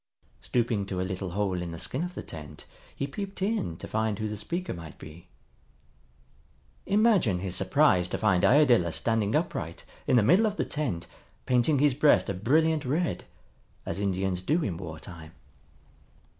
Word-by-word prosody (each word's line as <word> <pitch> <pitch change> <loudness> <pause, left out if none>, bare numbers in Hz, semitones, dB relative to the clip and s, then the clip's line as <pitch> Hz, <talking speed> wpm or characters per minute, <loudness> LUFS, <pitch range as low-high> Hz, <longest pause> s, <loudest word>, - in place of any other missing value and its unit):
Stooping 115 -5 0
to 95 -2 -3
a - - 0
little 95 -1 -4
hole 95 -3 -1
in 85 - -4
the - - -6
skin 130 - -2
of 180 0 -5
the - - -5
tent 75 -1 -10 0.3
he 140 - -2
peeped 195 +7 -6
in 195 - -1
to - - -8
find 110 -1 -1
who 110 - -2
the 105 - -4
speaker 170 - -4
might 80 -3 -10
be. 80 +3 -12 1.6
Imagine 200 - +3
his 90 0 -3
surprise 115 - +3
to - - -3
find 90 -1 +2
Iadilla 120 - +4
standing 110 -2 0
upright - - -2 0.2
in - - +3
the 115 - +5
middle 190 - +5
of 210 - -2
the - - 0
tent 130 - -3 0.4
painting 125 +4 +3
his 145 0 +3
breast 145 -3 +4
a - - -2
brilliant 150 - +2
red, 160 +7 -1 0.6
as 90 - -4
Indians 95 -2 -1
do 155 - +1
in 95 -6 -2
war 80 -3 -7
time. 80 -3 -11
105 Hz, 170 wpm, -28 LUFS, 90-150 Hz, 1.6 s, the